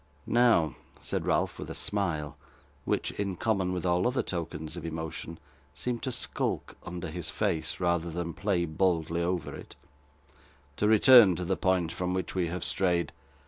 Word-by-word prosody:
'Now,' 115 - +3 0.2
said - - -3
Ralph, - - +1
with - - -6
a - - -6
smile, 85 -9 -2 0.5
which, - - 0
in 100 -2 -3
common 95 -2 0
with 90 -1 -3
all 90 +1 +2
other 125 +1 0
tokens 80 -3 -4
of 85 - -7
emotion, 80 0 -5 0.4
seemed 125 -2 -2
to 130 - -2
skulk - - -2
under 90 +1 -5
his 85 -1 -4
face, 80 - -1
rather 85 -1 +1
than 85 0 -4
play 95 -3 0
boldly 85 0 0
over 85 -2 -1
it - - -11 1.0
'to 105 - +2
return 110 -2 +8
to 90 - -3
the 95 +2 +1
point 90 -3 +1
from 90 +1 -2
which 95 -2 -2
we 90 -2 0
have 90 +1 -4
strayed. 90 -2 0
90 Hz, 165 wpm, -29 LUFS, 85-95 Hz, 1.0 s, return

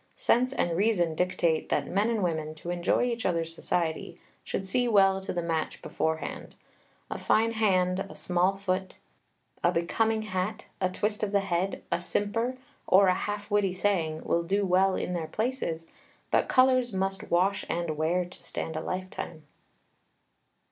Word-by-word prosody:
Sense 255 +2 +2
and 175 -10 0
reason 180 -4 +2
dictate 175 -2 0
that 145 - +1
men 200 +9 +1
and 225 -4 0
women, 155 -3 -2
to 170 +3 -6
enjoy 175 +5 +1
each 240 -2 -1
other's 165 -2 0
society, 165 0 -2 0.2
should 195 - -3
see 245 +6 +1
well 195 -3 +4
to 190 - -4
the 175 -1 -2
match 165 -1 -2
beforehand. 160 0 -3 0.6
A - - -3
fine 225 +1 +3
hand, 185 -5 +2
a - - -10
small 180 +2 +1
foot, 190 -1 -2 0.7
a 175 - +4
becoming 220 +6 +1
hat, 205 +2 -3
a 185 - +2
twist 210 +3 -2
of 210 -2 -1
the 200 -1 +3
head, 190 0 -1
a - - +1
simper, 230 +5 -1 0.3
or 190 0 +6
a - - +5
half 205 +2 -4
witty 205 -3 +2
saying 175 -5 0
will 170 - +1
do 195 +4 0
well 190 +1 +3
in 180 - -2
their 165 -3 -2
places; 215 -9 -2 0.5
but - - +2
colors 255 -2 +4
must 195 0 -2
wash 190 +4 +2
and 170 -2 -1
wear 170 +4 +1
to 180 - -14
stand 160 - -4
a 155 - -2
lifetime. 185 -4 -5
185 Hz, 165 wpm, -28 LUFS, 170-205 Hz, 0.7 s, or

